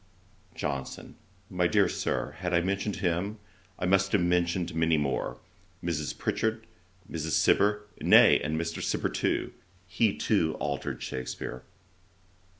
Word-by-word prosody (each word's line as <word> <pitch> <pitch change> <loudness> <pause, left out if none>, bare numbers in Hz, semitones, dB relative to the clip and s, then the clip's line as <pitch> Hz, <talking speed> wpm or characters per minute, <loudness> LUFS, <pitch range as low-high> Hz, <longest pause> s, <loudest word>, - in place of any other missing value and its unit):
JOHNSON. 70 -3 -4 0.4
'My 90 -1 +2
dear 75 - +4
Sir, - - -2
had 90 -1 -1
I 85 - +4
mentioned 100 +3 -1
him, 90 +4 -1 0.4
I - - -2
must 95 +1 +2
have 100 - +4
mentioned 85 0 +1
many 80 0 +2
more: 70 -2 -1 0.5
Mrs. 80 -3 -2
Pritchard, 110 0 -1 0.4
Mrs. 80 0 -3
Cibber, 105 +1 +3 0.2
nay, - - +7
and 80 +2 -2
Mr. 85 0 -3
Cibber - - 0
too; - - -1 0.3
he 100 +3 +1
too 80 -7 +1
altered 70 -3 -3
Shakspeare.' 60 0 -5
85 Hz, 130 wpm, -28 LUFS, 75-95 Hz, 0.5 s, nay